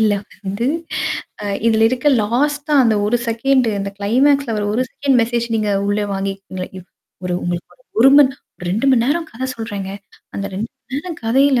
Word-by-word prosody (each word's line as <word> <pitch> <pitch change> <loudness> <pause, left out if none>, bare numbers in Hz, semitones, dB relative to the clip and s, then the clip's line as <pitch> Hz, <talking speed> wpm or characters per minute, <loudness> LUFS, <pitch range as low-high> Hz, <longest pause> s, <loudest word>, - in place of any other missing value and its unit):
இல்ல 215 -2 +4 0.3
வந்து 200 +5 -2 0.8
அ - - -4 0.2
இதில 220 -1 +3
இருக்க 255 +4 +1
லாஸ்ட்டா 290 +7 0
அந்த 225 -2 +3
1 240 +3 +2
செகண்டு 245 +1 +2
அந்த 195 0 -3
கிளைமாக்ஸ்ல 255 +4 +2
அவரு 210 -1 -1
ஒரு 255 - +2
செகண்ட் 275 -3 +2
மெசேஜ் 235 0 -1
நீங்க 210 -1 0 0.2
உள்ள 205 +1 +1
வாங்கிக்கிறீங்களா? 195 -1 -4
இவ 185 - -9 0.4
ஒரு 180 - -1
உங்களுக்கு 175 0 -3
ஒரு - - -29 0.2
ஒரு 270 +3 +8
மண் 270 -2 +6 0.4
2 220 +8 0
மணி 235 -3 +4
நேரம் 320 +3 0
கதை 260 +3 -3
சொல்றேங்க. 205 -4 -5 0.4
அந்த 200 0 -3
2 220 +4 -3
மணி 255 - -11
நேரம் 330 +2 -5
கதையில 265 +2 +4
230 Hz, 175 wpm, -19 LUFS, 205-270 Hz, 0.8 s, ஒரு